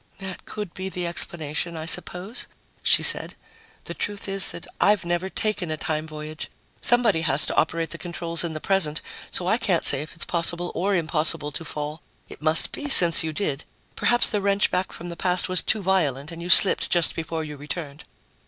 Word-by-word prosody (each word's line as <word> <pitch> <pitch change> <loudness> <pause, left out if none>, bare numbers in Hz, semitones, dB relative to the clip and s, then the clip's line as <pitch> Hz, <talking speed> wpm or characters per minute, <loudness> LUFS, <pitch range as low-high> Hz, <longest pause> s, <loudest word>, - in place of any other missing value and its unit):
"That 190 -2 -9
could 210 -5 -7
be 190 +1 -5
the 180 -2 -5
explanation, 170 -1 -2
I 160 - -6
suppose," 180 +6 0 0.3
she - - +4
said. - - +3 0.5
"The - - -7
truth 205 -1 -5
is 195 0 +3
that - - -5 0.2
I've 205 -2 +3
never 175 +2 -2
taken 205 -4 -3
a 155 - -3
time 155 0 -3
voyage 155 0 -8 0.3
somebody 235 -8 +2
has 150 -2 +1
to - - -4
operate 165 +1 0
the 170 - -6
controls 170 -1 -1
in 170 -2 -3
the 155 - -5
present 165 -4 0 0.3
so 180 - -4
I 220 +6 +1
can't 185 -7 0
say 135 - +7
it's 155 +3 -5
possible 170 +1 -2
or 195 +3 -1
impossible 155 -3 -1
to 155 - -5
fall. 150 0 -6 0.3
It - - -12
must 155 +1 +3
be, 290 - -6
since 170 - +8
you 160 - -3
did. 150 -5 -4 0.3
Perhaps 240 0 +4
the 210 -3 -1
wrench 200 0 +1
back 185 +1 -2
from 175 - -9
the 170 - -7
past 180 +1 -1
was 185 -1 +2
too 215 -2 0
violent 160 -6 -1
and 165 0 -9
you 175 - -7
slipped 190 +1 +7
just 175 -2 +1
before 165 0 -4
you 150 -1 -8
returned." 145 +1 -8
170 Hz, 200 wpm, -23 LUFS, 155-190 Hz, 0.5 s, since